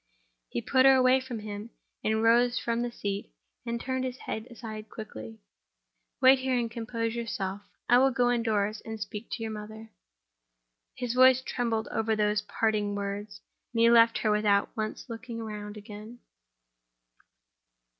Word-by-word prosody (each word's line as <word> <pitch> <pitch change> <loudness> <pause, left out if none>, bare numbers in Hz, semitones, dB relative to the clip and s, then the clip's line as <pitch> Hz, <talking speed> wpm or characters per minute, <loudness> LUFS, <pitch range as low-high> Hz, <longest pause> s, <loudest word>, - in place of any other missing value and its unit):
He 120 - -3
put 260 0 +4
her 270 - +8
away 255 0 +5
from 255 -3 -6
him, 210 +1 -7 0.3
and 220 +1 +1
rose 240 +2 +4
from 235 0 -1
the 240 0 -2
seat, 200 -3 -4 0.4
and 235 0 -2
turned 260 +1 -2
his 255 -1 -3
head 220 -2 -5
aside 220 -2 -8
quickly. 110 - -8 0.8
"Wait 260 0 +7
here, 260 -1 0
and 235 -2 -1
compose 230 0 -3
yourself; 205 -4 -3 0.3
I 245 +1 +6
will 270 +1 +5
go 245 -2 +2
indoors 215 -3 0
and 220 0 -6
speak 210 +1 -6
to 225 - -4
your 220 - -3
mother." 215 +1 -8 1.0
His 245 -1 -3
voice 255 0 +6
trembled 230 -2 -1
over 225 0 0
those 210 0 +1
parting 210 -1 0
words; 200 0 -5 0.3
and - - +1
he 230 0 +6
left 230 -1 +6
her 215 - +1
without 210 0 +2
once 215 +2 -4
looking 230 -1 -6
round 210 -1 -6
again. 210 +2 -10
225 Hz, 155 wpm, -28 LUFS, 210-240 Hz, 1.0 s, her